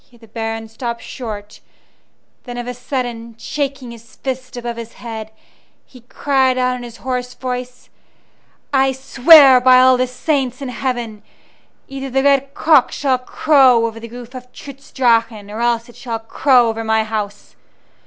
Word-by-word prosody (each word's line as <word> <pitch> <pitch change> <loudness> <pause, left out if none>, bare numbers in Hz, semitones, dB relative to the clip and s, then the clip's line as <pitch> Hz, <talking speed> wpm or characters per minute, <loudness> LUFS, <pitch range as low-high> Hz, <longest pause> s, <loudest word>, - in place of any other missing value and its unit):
Here 240 - -21
the 225 -1 -18
Baron 225 0 -5
stopped 235 +1 -6
short; 210 -4 -8 0.9
then 245 -1 -7
of 240 - -5
a 250 - -5
sudden, 240 -3 -5
shaking 275 0 -4
his 230 0 -14
fist 255 -1 -6
above 240 -1 -5
his 230 0 -9
head, 220 -2 -8 0.6
he 250 - -17
cried 260 +1 0
out 255 0 +1
in 250 - -7
his 235 -1 -10
hoarse 250 -1 -3
voice: 250 -1 -6 0.8
"I 270 0 +3
swear 265 0 +7
by 255 0 +6
all 255 0 +5
the 255 0 0
saints 255 -1 -2
in 275 -2 -5
heaven, 240 -4 -4 0.7
either 270 0 -6
the 270 +1 0
red 275 -1 +2
cock 305 -5 +4
shall 265 -3 0
crow 255 -3 +3
over 225 0 -5
the 230 +1 -9
roof 245 +1 -11
of 250 -1 -10
Trutz 275 +1 -12
Drachen 230 -4 +1
or 215 - -6
else 235 -1 0
it 240 - -16
shall 235 -3 -4
crow 245 +2 +2
over 225 0 -3
my 220 0 +1
house! 210 -2 -5
250 Hz, 165 wpm, -18 LUFS, 230-260 Hz, 0.9 s, swear